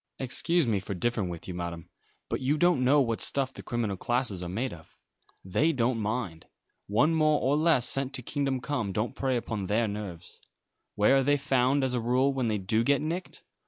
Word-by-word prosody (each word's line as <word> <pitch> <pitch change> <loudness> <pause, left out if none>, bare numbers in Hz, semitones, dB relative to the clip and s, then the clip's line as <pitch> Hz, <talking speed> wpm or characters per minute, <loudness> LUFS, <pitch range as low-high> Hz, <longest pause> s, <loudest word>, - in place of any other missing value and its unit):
"Excuse 160 +5 +2
me 110 -4 +1
for 100 +1 -5
differing 105 -1 -1
with 85 -2 -7
you, 90 - -5
Madam, 85 -1 -5 0.4
but - - -3
you 140 +4 +1
don't 175 -5 +3
know 140 +3 +5
what 115 -4 -1
stuff 135 -1 -1
the - - -9
criminal 120 -5 -2
classes 120 -2 -1
are 90 - -5
made 120 +8 -2
of. 80 -2 -15 0.5
They 105 - +2
don't 120 -2 0
mind. 105 -6 -3 0.4
One 145 +11 +3
more 155 -2 +3
or 135 +2 +1
less 155 -5 +3
sent 135 0 0
to 125 - -3
kingdom 135 -1 -2
come 125 -8 -2
don't 110 +6 -2
prey 130 -2 0
upon 110 -5 -4
their 110 +3 +1
nerves. 100 -5 -7 0.5
Where 105 +6 +4
are 135 - +2
they 145 +2 +3
found, 135 -1 +1
as 130 -1 0
a 125 - 0
rule, 130 +4 +2
when 130 -3 -1
they 110 -1 0
do 110 +4 0
get 140 +3 +3
nicked? 165 +5 -5
125 Hz, 205 wpm, -28 LUFS, 105-140 Hz, 0.5 s, know